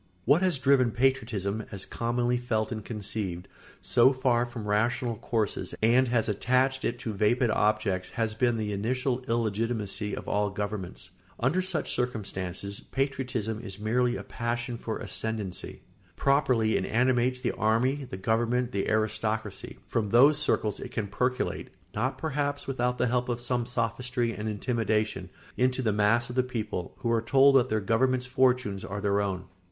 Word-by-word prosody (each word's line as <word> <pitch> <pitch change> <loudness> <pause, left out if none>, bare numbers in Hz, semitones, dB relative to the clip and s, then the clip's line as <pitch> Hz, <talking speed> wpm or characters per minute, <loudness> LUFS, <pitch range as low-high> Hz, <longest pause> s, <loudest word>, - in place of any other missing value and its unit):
] 90 - -36
What 145 +7 +5
has 185 -5 +2
driven 130 -2 +4
patriotism, 110 -5 0
as 95 -2 -5
commonly 120 +1 0
felt 110 -2 -1
and 110 -2 -4
conceived, 100 -4 -4 0.4
so 120 +2 +5
far 125 -2 +1
from 120 -3 -7
rational 115 +3 +1
courses 110 -1 -2
and 120 +4 +4
has 115 -2 +1
attached 130 +5 +1
it 120 - -1
to 110 - -3
vapid 110 +4 +2
objects 105 -4 +1
has 110 -2 0
been 120 +1 +1
the 105 -1 -2
initial 125 +5 -1
illegitimacy 110 -2 -1
of - - -7
all 105 0 +1
governments. 100 -2 -5 0.3
Under 145 +10 +2
such 185 -4 0
circumstances, 100 -5 -3
patriotism 130 -5 -2
is 100 -5 -7
merely 120 +3 +1
a - - -5
passion 120 0 -3
for 115 -1 -4
ascendency. 110 -5 -4 0.3
Properly 125 -6 +2
it 95 - -1
animates 125 +1 +2
the - - 0
army, 125 +6 +1
the 95 - -7
government, 120 +5 +1
the 100 -4 -1
aristocracy; 110 -1 -1
from 110 -3 -1
those 140 +7 +6
circles 110 -8 0
it - - -6
can 110 - -2
percolate, 125 +6 -1 0.2
not 130 +5 -1
perhaps 145 -2 -2
without 125 -2 -1
the 125 - +2
help 125 +1 0
of 120 -1 -1
some 120 -1 -1
sophistry 120 0 -1
and 110 0 -4
intimidation, 110 -3 -1 0.3
into 130 +1 +2
the 110 -3 +2
mass 105 +3 +3
of 125 - -7
the 130 - +4
people, 115 -8 -4
who 115 - 0
are 115 -1 +2
told 135 +4 +5
that 130 -1 +4
their 110 - +1
government's 125 +5 +1
fortunes 125 -6 +1
are 100 +2 -4
their 100 0 +1
own. 95 -2 -2
115 Hz, 165 wpm, -28 LUFS, 105-125 Hz, 0.4 s, those